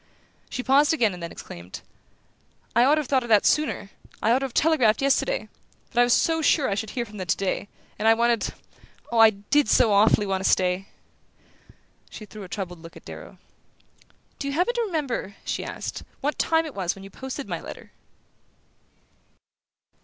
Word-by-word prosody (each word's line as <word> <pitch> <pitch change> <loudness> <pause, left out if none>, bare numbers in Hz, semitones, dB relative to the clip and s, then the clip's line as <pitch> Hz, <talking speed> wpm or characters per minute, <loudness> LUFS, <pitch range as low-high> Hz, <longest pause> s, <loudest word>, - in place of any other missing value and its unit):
She 250 - -4
paused 285 +4 +4
again 225 -9 +2
and 180 - -9
then 170 - -5
exclaimed: 85 +2 -10 0.9
"I 240 +1 +6
ought 290 +3 +5
to 310 - +1
have 290 - -8
thought 265 -1 +2
of 240 - -7
that 210 -2 +5
sooner; 300 -9 +1 0.3
I 225 - +2
ought 250 - +4
to 270 - -2
have 260 - -7
telegraphed 260 -9 +3
yesterday! 280 - +1 0.5
But 240 - +4
I - - +7
was 245 +6 +3 0.2
sure 290 -5 +3
I - - 0
should 215 +2 -3
hear 240 - 0
from 210 -1 -12
them 185 -2 -5
today; 195 +1 -1 0.3
and 215 - +1
I 225 - +7
wanted 235 -1 +1 0.6
oh, 235 - +1
I 225 0 +9
DID 220 +6 0
so 220 -3 +4
awfully 205 +1 +4
want 190 -1 -1
to - - +3
stay!" 185 +1 +1 1.2
She 215 - -9
threw 210 +1 -11
a 190 - -9
troubled 180 -4 -5
look 165 0 -12
at - - -16
Darrow. - - -10 1.0
"Do 280 - -3
you 280 - -2
happen 360 +9 +1
to 475 - -1
remember," 295 - -3
she - - -2
asked, - - -6 0.2
"what 295 +2 -2
time 325 0 +2
it 305 - -7
was 185 -3 -2
when 195 - -12
you 195 - -11
posted 265 +4 -6
my - - -4
letter?" - - -10
230 Hz, 190 wpm, -25 LUFS, 200-280 Hz, 1.2 s, I